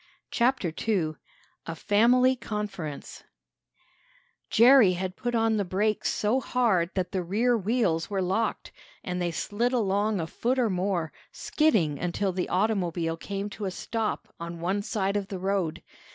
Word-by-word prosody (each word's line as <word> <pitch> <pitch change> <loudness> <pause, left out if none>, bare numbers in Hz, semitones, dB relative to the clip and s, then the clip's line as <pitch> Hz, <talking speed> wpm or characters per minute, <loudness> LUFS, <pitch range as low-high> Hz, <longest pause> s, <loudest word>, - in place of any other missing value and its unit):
CHAPTER 235 -9 +1
II 175 -8 +1 0.5
A 165 - -4
FAMILY 245 +8 +4
CONFERENCE 205 - -6 1.3
Jerry 235 -4 +6
had 185 +1 -4
put 240 0 -3
on 225 -1 +2
the 205 - +1
brakes 200 +3 0
so 215 +5 +1
hard 220 -10 +1
that 185 -2 -1
the 190 - -1
rear 220 +8 +1
wheels 205 -6 0
were 200 -2 -1
locked, 190 +5 -1 0.3
and 180 0 -3
they 175 - 0
slid 220 +9 -1
along 205 -2 +1
a 165 - -1
foot 245 +9 -1
or 235 -5 +2
more, 180 -3 -1 0.2
skidding 185 - +1
until 185 +3 -1
the 180 0 -3
automobile 180 -4 0
came 200 +4 -5
to 210 - -6
a - - -1
stop 220 +4 -4
on 170 0 -6
one 190 +4 -1
side 200 -1 -1
of 200 -1 -1
the 195 - -5
road. 185 -3 -2
200 Hz, 150 wpm, -27 LUFS, 180-225 Hz, 1.3 s, Jerry